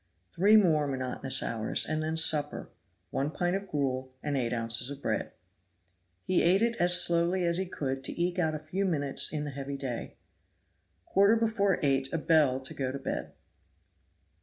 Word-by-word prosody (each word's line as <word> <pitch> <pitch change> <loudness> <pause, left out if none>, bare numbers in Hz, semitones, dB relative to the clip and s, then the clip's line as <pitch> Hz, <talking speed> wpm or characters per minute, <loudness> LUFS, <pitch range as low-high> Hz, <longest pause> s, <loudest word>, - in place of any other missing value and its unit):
Three 205 +5 +4
more 155 -8 +3
monotonous 130 0 0
hours, 110 -1 0
and 155 0 -2
then 160 +1 -2
supper 150 -2 0 0.4
one 140 +2 -1
pint 175 +3 -1
of 195 0 -5
gruel, 130 -4 -3
and 145 -1 -2
eight 120 -3 -1
ounces 115 +1 +1
of 140 -1 -7
bread. - - -3 0.9
He 185 - +1
ate 190 +5 +3
it 235 0 +1
as 175 0 +5
slowly 175 +2 +3
as 170 +1 0
he 190 - -2
could 135 -6 -4
to - - -6
eke 175 +1 -1
out 160 -3 0
a - - -5
few 155 +6 -4
minutes 145 -7 +2
in 150 -1 -3
the 145 - -5
heavy 140 +1 -6
day. 130 -4 -6 0.9
Quarter 200 +3 +3
before 220 -4 +1
eight 135 -1 +1
a - - -1
bell 150 -5 +2
to 135 +4 -2
go 135 -4 -3
to 140 - -5
bed. 135 - -5
155 Hz, 180 wpm, -29 LUFS, 135-180 Hz, 0.9 s, as